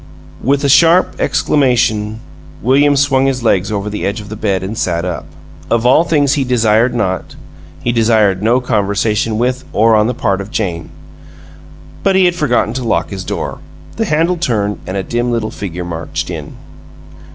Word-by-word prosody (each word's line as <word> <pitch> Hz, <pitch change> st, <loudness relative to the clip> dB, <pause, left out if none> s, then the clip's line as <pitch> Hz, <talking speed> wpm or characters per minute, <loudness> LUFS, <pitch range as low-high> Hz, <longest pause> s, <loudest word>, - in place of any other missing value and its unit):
With 140 Hz, +3 st, +1 dB
a -, -, +2 dB
sharp 165 Hz, +6 st, +4 dB
exclamation 115 Hz, -6 st, +1 dB, 0.4 s
William 140 Hz, +4 st, +4 dB
swung 135 Hz, -1 st, +2 dB
his 130 Hz, -3 st, -1 dB
legs 100 Hz, -3 st, +1 dB
over 100 Hz, -1 st, -2 dB
the 105 Hz, 0 st, -4 dB
edge 100 Hz, +3 st, -2 dB
of 105 Hz, -1 st, -10 dB
the 110 Hz, -, -6 dB
bed 100 Hz, -4 st, -1 dB
and 100 Hz, +4 st, -4 dB
sat 85 Hz, -4 st, -1 dB
up. 85 Hz, -4 st, -4 dB, 0.4 s
Of 115 Hz, 0 st, +1 dB
all 130 Hz, +6 st, +5 dB
things 145 Hz, -4 st, +2 dB
he 145 Hz, -, +1 dB
desired 120 Hz, -1 st, +2 dB
not, 95 Hz, -5 st, -2 dB, 0.5 s
he 120 Hz, -, +1 dB
desired 110 Hz, -5 st, +2 dB
no 115 Hz, +4 st, +3 dB
conversation 105 Hz, -1 st, 0 dB
with, 125 Hz, +3 st, -1 dB
or 110 Hz, +1 st, +4 dB
on 105 Hz, 0 st, +3 dB
the 125 Hz, -, -2 dB
part 100 Hz, -4 st, 0 dB
of, 100 Hz, -, -8 dB
Jane. 90 Hz, -8 st, -3 dB, 1.1 s
But 195 Hz, -1 st, +2 dB
he 190 Hz, -1 st, +4 dB
had 175 Hz, -, +3 dB
forgotten 125 Hz, -9 st, 0 dB
to 130 Hz, 0 st, -4 dB
lock 115 Hz, -, -1 dB
his 95 Hz, -2 st, -5 dB
door -, -, -4 dB, 0.4 s
the 225 Hz, -, 0 dB
handle 165 Hz, +1 st, +1 dB
turned, 105 Hz, -11 st, -1 dB
and 95 Hz, -, -3 dB
a 95 Hz, -, -2 dB
dim 120 Hz, +3 st, -2 dB
little 115 Hz, -2 st, -2 dB
figure 90 Hz, -3 st, -6 dB
marched 85 Hz, -1 st, -4 dB
in. -, -, -7 dB
115 Hz, 180 wpm, -15 LUFS, 100-135 Hz, 1.1 s, all